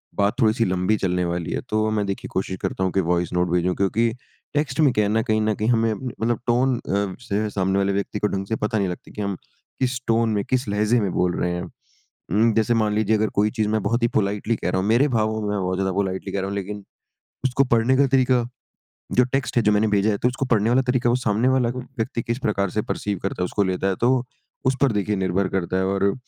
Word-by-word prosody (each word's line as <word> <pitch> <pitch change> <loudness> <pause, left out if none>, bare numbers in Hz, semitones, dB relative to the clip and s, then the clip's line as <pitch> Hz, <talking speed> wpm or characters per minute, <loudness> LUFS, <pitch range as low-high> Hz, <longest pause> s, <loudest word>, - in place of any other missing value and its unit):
बात 100 0 +2
थोड़ी-सी 115 +1 +3
लंबी 95 +3 +1
चलने 90 -2 0
वाली 85 -1 -3
है - - -1
तो 110 0 +1
मैं 105 -1 0
देखिए 120 +6 -4
कोशिश 95 0 -2
करता 95 - -2
हूँ 95 - +1
कि 95 - +2
वॉइस 85 0 0
नोट 90 0 +1
भेजूँ। 90 +1 +1
क्योंकि 115 +4 +1 0.4
टेक्स्ट 145 -2 -1
में 145 -4 +5
क्या 105 -2 +2
है - - 0
ना, 110 +1 +2
कहीं 110 -2 +1
न 110 0 +1
कहीं 110 +2 -1
हमें 115 -2 +2
मतलब 120 -1 -2
टोन 125 +2 +3
अ, 100 -3 -2
से 110 -2 -2
सामने 95 -1 0
वाले 100 0 +1
व्यक्ति 100 0 -2
को 105 - +1
ढँग 95 -1 -3
से 110 - -1
पता 105 +1 -1
नहीं 100 - +1
लगती 90 - -8
कि 105 - -6
हम 100 -2 -2 0.4
किस 130 -1 0
टोन 115 0 +2
में 100 - 0
किस 130 -2 0
लहज़े 105 +4 +2
में 100 -3 -1
बोल 90 -1 +1
रहे 90 - 0
हैं? 90 0 -3 0.7
उम, 110 +3 +3
जैसे 110 +2 +2
मान 110 -2 +1
लीजिए 110 0 +2
अगर 110 0 +1
कोई 105 +1 +3
चीज़ 110 -3 -1
मैं 110 0 +1
बहुत 115 +4 0
ही - - +5
पोलाइटली 105 +3 -1
कह 90 - -3
रहा 95 - 0
हूँ। 95 - -2
मेरे 125 +6 +4
भावों 110 0 0
में 105 - -2
मैं 105 - -1
बहुत 90 0 -1
ज़्यादा 95 0 0
पोलाइटली 95 0 -2
कह 100 - -1
रहा 95 - -2
हूँ 100 - -4
लेकिन 100 +1 -5 0.6
उसको 130 +1 +3
पढ़ने 125 +3 +3
का 140 - +4
तरीका 125 -2 +3 0.8
जो - - +8
टेक्स्ट 135 -2 -1
है 120 - +4
जो 105 - +4
मैंने 105 +1 +3
भेजा 105 +2 +2
है 100 - 0
तो 125 - +1
उसको 135 +2 -1
पढ़ने 110 +1 +2
वाला 125 +2 +4
तरीका 125 -2 +1
है - - +4
वो - - +3
सामने 110 +4 +2
वाला 120 -2 +1
व्यक्ति 125 -2 -4
किस 115 +2 -3
प्रकार 100 -5 0
से 105 - -1
प, - - -12
परसीव 105 -1 -2
करता 95 -1 -3
है - - +2
उसको 100 +3 0
लेता 95 +1 -1
है 95 - +1
तो 130 0 +2 0.4
उस 130 0 +3
पर 140 -4 +4
देखिए 105 0 0
निर्भर 95 0 0
करता 95 -1 -1
है। 95 - +1
और 100 +1 +1
105 Hz, 260 wpm, -23 LUFS, 95-115 Hz, 0.8 s, जो